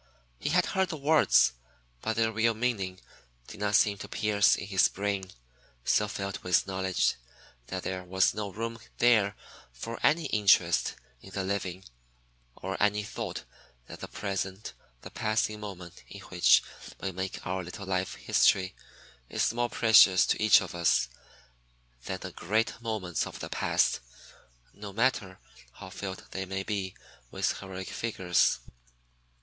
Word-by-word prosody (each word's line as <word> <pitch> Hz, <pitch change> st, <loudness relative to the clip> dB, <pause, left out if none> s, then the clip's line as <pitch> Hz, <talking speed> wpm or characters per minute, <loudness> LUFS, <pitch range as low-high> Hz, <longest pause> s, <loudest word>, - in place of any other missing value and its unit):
He -, -, -2 dB
had -, -, +3 dB
heard 190 Hz, -1 st, 0 dB
the 160 Hz, -, -4 dB
words, 145 Hz, -, +4 dB, 0.5 s
but 110 Hz, 0 st, -1 dB
their 115 Hz, 0 st, +2 dB
real 115 Hz, +1 st, +1 dB
meaning 105 Hz, -6 st, -2 dB, 0.5 s
did 110 Hz, -, -11 dB
not 105 Hz, 0 st, +1 dB
seem 100 Hz, -1 st, +3 dB
to -, -, -7 dB
pierce 105 Hz, -2 st, +3 dB
his 95 Hz, -1 st, +2 dB
brain, 100 Hz, -1 st, -3 dB, 0.6 s
so 105 Hz, -, +3 dB
filled 100 Hz, -1 st, -4 dB
with 90 Hz, 0 st, +2 dB
knowledge 95 Hz, -1 st, 0 dB, 0.5 s
that -, -, -4 dB
there 95 Hz, -1 st, -3 dB
was 95 Hz, +1 st, +2 dB
no 105 Hz, -1 st, -4 dB
room 115 Hz, +3 st, -5 dB, 0.2 s
there 110 Hz, -4 st, +4 dB, 0.4 s
for 85 Hz, -, -7 dB
any 160 Hz, +1 st, +3 dB
interest 105 Hz, -3 st, +3 dB, 0.3 s
in -, -, -12 dB
the 95 Hz, 0 st, -3 dB
living, 95 Hz, -1 st, -3 dB, 0.7 s
or 95 Hz, 0 st, -5 dB
any 105 Hz, 0 st, +2 dB
thought 105 Hz, -, -5 dB, 0.4 s
that -, -, -10 dB
the -, -, -6 dB
present, 100 Hz, 0 st, -4 dB, 0.3 s
the -, -, -10 dB
passing 110 Hz, -1 st, -1 dB
moment 95 Hz, -5 st, -9 dB
in -, -, -10 dB
which -, -, +4 dB, 0.4 s
we 95 Hz, -, -3 dB
make 95 Hz, +1 st, -5 dB
our 95 Hz, 0 st, -2 dB
little 90 Hz, +3 st, -8 dB
life 95 Hz, -1 st, -1 dB
history, 95 Hz, -1 st, +2 dB, 0.6 s
is -, -, 0 dB
more 120 Hz, 0 st, 0 dB
precious 100 Hz, -6 st, +6 dB
to -, -, 0 dB
each 110 Hz, -1 st, +7 dB
of 95 Hz, -, -8 dB
us 85 Hz, -7 st, +2 dB, 1.0 s
then 95 Hz, -, -3 dB
the 95 Hz, -, -6 dB
great 110 Hz, +7 st, -1 dB
moments 105 Hz, -7 st, -2 dB
of -, -, -9 dB
the -, -, -6 dB
past, -, -, +1 dB, 0.7 s
no 100 Hz, -1 st, -8 dB
matter 105 Hz, -5 st, 0 dB, 0.4 s
how 95 Hz, -, -11 dB
filled 95 Hz, 0 st, -6 dB
they 95 Hz, -, -3 dB
may 95 Hz, +1 st, -3 dB
be 95 Hz, -2 st, -3 dB, 0.3 s
with -, -, -1 dB
heroic 95 Hz, -1 st, -7 dB
figures. 90 Hz, -9 st, +1 dB
100 Hz, 150 wpm, -29 LUFS, 95-110 Hz, 1.0 s, each